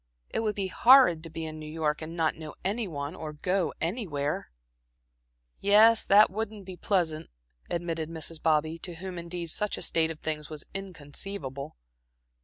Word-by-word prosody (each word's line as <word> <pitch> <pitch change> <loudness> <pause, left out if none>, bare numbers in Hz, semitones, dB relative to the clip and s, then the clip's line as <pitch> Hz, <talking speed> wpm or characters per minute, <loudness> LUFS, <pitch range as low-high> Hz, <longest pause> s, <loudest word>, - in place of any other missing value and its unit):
It - - 0
would 215 -2 0
be 200 - -1
horrid 235 -4 +6
to 165 - -8
be 160 0 -5
in 155 0 -6
New 155 0 -7
York 155 -1 -1
and 160 +1 -6
not 160 -1 +2
know 155 -1 -9
any 210 +3 0
one 145 -2 -4
or 155 -4 -6
go 180 +4 0
anywhere." 160 - -2 1.1
"Yes, 215 +3 +6
that 205 0 +7
wouldn't 215 -1 -4
be 185 -1 -7
pleasant," 170 -5 0 0.4
admitted 165 -2 -2
Mrs. 160 -1 -6
Bobby, 160 +1 +2
to 175 0 -6
whom 180 +1 -6
indeed 170 -1 -5
such 210 +4 -1
a - - -2
state 160 -1 +2
of 160 -1 -6
things 150 -1 -3
was 155 -2 -6
inconceivable. 150 -5 -6
165 Hz, 170 wpm, -28 LUFS, 155-195 Hz, 1.1 s, that